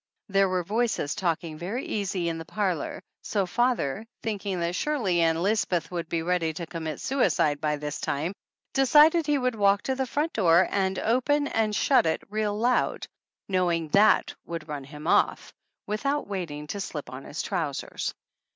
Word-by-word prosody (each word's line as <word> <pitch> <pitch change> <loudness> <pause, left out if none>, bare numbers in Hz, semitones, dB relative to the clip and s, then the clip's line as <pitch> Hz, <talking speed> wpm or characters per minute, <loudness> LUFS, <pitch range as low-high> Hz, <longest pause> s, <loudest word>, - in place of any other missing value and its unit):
There 195 -1 +3
were 185 -1 0
voices 220 -6 0
talking 170 -4 -2
very 205 +9 -3
easy 195 -4 -2
in 165 -1 -2
the - - -5
parlor, 185 -3 -2 0.2
so 200 -3 0
father, 225 - 0 0.2
thinking 200 -4 -2
that 170 +1 -1
surely 200 - 0
Ann 165 0 +2
Lisbeth 185 -5 0
would 170 -2 -4
be 165 -1 -1
ready 170 -2 0
to 170 +1 -5
commit 160 -2 -5
suicide 160 - +1
by 150 -1 +1
this 150 0 -5
time, 155 +6 -1 0.4
decided 300 +4 +5
he 295 -1 +3
would 255 -2 0
walk 200 -2 +3
to 265 - 0
the 260 0 -2
front 300 +6 -1
door 175 -3 +4
and 190 -1 0
open 285 +5 +1
and 220 -4 0
shut 265 - +4
it 160 - 0
real 210 -1 -1
loud, 245 +3 +1 0.4
knowing 175 -4 +1
that 205 +6 +4
would 165 -2 -6
run 145 -3 -5
him 150 +2 -10
off, - - +2 0.3
without 275 +8 -1
waiting 170 -7 -4
to 200 +6 -4
slip 150 -8 -6
on 130 +1 -8
his 150 - -4
trousers. 160 -8 -3
185 Hz, 170 wpm, -27 LUFS, 165-220 Hz, 0.4 s, decided